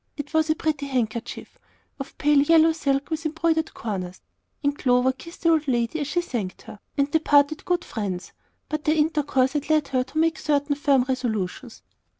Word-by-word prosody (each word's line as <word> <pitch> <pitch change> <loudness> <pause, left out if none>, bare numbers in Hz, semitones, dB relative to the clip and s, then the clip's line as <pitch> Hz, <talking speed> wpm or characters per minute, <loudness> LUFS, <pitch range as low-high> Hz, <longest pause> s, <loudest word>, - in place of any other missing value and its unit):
It 290 +1 -6
was 315 0 +2
a 310 - +3
pretty 300 -3 -2
handkerchief, 235 -4 -3 0.4
of 275 - -8
pale 295 -1 +4
yellow 325 +2 +5
silk 280 -2 -1
with 320 0 -2
embroidered 320 0 0
corners, 185 -5 -5 0.4
and 285 0 +1
Clover 250 -1 +2
kissed 335 +6 -13
the 335 - +4
old 315 -2 +2
lady 240 +4 0
as 290 - -2
she 350 +4 0
thanked 225 - -5
her, 205 - -11 0.2
and 280 0 +1
they 320 - +3
parted 290 0 +3
good 355 -1 0
friends. 190 -5 -4 0.4
But 305 -1 -4
their 310 - +3
intercourse 295 -4 +1
had 295 0 -3
led 305 -2 +2
her 255 -2 +1
to 265 +4 -9
make 325 0 +2
certain 290 -1 +1
firm 280 -3 +3
resolutions. 240 -3 -3
285 Hz, 185 wpm, -24 LUFS, 255-315 Hz, 0.4 s, yellow